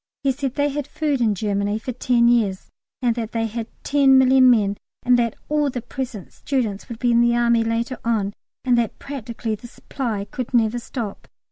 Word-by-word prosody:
He 275 - +3
said 265 -1 -3
they 290 0 +1
had 290 0 -4
food 300 -4 -1
in 215 -3 +2
Germany 205 +1 -1
for 240 +3 -5
ten 245 -1 +2
years, 215 -6 +1 0.3
and 240 -1 +3
that 230 -1 -4
they 225 -1 0
had 225 0 -4 0.2
ten 275 -2 +5
million 260 0 +6
men, 205 -4 +3 0.3
and 250 0 +4
that 230 -2 0
all 300 -1 +1
the 250 -3 -5
present 245 -8 -6
students 235 -6 -2
would 235 - -6
be 245 +1 +1
in 235 0 +4
the 235 0 +3
Army 235 -1 +3
later 230 +3 -2
on, 215 -4 0 0.3
and 250 -1 +4
that 230 -3 -2
practically 235 -4 -5
the 215 +3 -7
supply 230 -4 -4
could 250 +4 -5
never 230 0 +2
stop. 235 -4 -6
235 Hz, 200 wpm, -22 LUFS, 220-260 Hz, 0.3 s, million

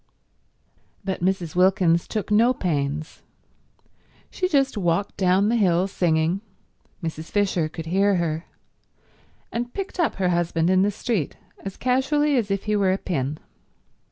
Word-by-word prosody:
But 190 -3 -3
Mrs. 180 -2 -1
Wilkins 180 -2 +3
took 215 -1 -3
no 235 +4 +4
pains. 150 -4 -2 1.1
She 365 - -1
just 275 -7 +2
walked 185 0 0
down 190 +1 +3
the 235 - +2
hill 185 -5 +3
singing—Mrs. 165 -2 -3
Fisher 190 -6 +1
could 165 0 -7
hear 195 +4 +2
her—and 175 +7 -7
picked 390 -1 -5
up 335 - +1
her 185 -2 0
husband 170 0 +1
in 185 0 +4
the 200 - +3
street 205 - -2 0.3
as 195 -1 -6
casually 275 +4 +2
as 230 -5 0
if 195 -1 -1
he 210 0 0
were 195 -2 +3
a 190 - +1
pin. 150 -6 -2
190 Hz, 135 wpm, -24 LUFS, 170-215 Hz, 1.1 s, no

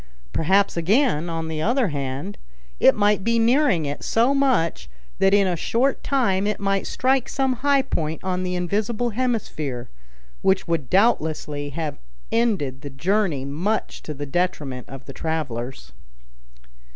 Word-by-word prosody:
Perhaps, 195 +5 +2
again, 175 - +2
on 165 -1 -3
the 160 -1 -3
other 240 - +2
hand, 135 - -4 0.4
it - - +6
might 205 -1 +2
be 230 +2 +2
nearing 230 - +3
it 145 0 -4
so 235 +5 +2
much 255 - +1 0.3
that 195 - +4
in 200 0 +5
a 180 -2 +1
short 245 - 0
time 205 -8 +1
it 210 - -1
might 195 -1 0
strike 260 0 +1
some 265 -2 0
high 280 +1 +3
point 160 - -2
on 185 -1 -1
the 180 0 -2
invisible 215 +6 -1
hemisphere, 205 - -2 0.5
which 190 0 +2
would 165 -6 -1
doubtlessly 155 -8 +1
have 155 -1 -4 0.3
ended 190 - 0
the 145 - -6
journey 165 0 0
much 175 +10 -2
to 150 - -6
the 145 +1 -5
detriment 145 -5 -2
of 135 0 -9
the - - -9
travelers. 130 - -4
185 Hz, 150 wpm, -23 LUFS, 150-230 Hz, 0.5 s, it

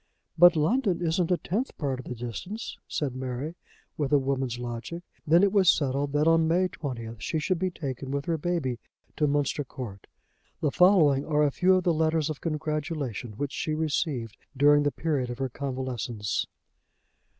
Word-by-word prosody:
"But 175 +1 +7
London 190 - +2
isn't 170 0 0
a 180 - +3
tenth 225 +11 -3
part 135 -4 -2
of 130 - -8
the 125 - -5
distance," 120 - -6
said 135 -4 -2
Mary, 130 +4 -4 0.4
with 145 -2 -1
a 145 - +6
woman's 135 -3 -1
logic. 120 +8 -5 0.2
Then 170 +5 +6
it 200 - +4
was 190 -4 +5
settled 140 -1 +1
that 150 +2 +2
on 165 0 +4
May 180 +3 +2
20th 115 -8 -6
she 130 +8 -1
should 170 +3 0
be 185 0 +1
taken 135 -6 -5
with 140 +1 -2
her 165 -2 -1
baby 145 -8 -1 0.4
to 150 - +2
Munster 145 0 0
Court. 115 -7 -8 0.5
The 150 - +1
following 160 -7 +5
are 150 -1 +2
a 145 - +3
few 185 +5 +4
of 185 - +1
the 175 - +3
letters 160 -1 +1
of 150 - -7
congratulation 150 - -3
which 145 +1 -2
she 155 - -2
received 145 - -1 0.2
during 145 +1 +6
the 145 0 +1
period 145 -7 -1
of 120 - -5
her 135 0 -2
convalescence. 125 -5 -3
145 Hz, 180 wpm, -27 LUFS, 130-165 Hz, 0.5 s, But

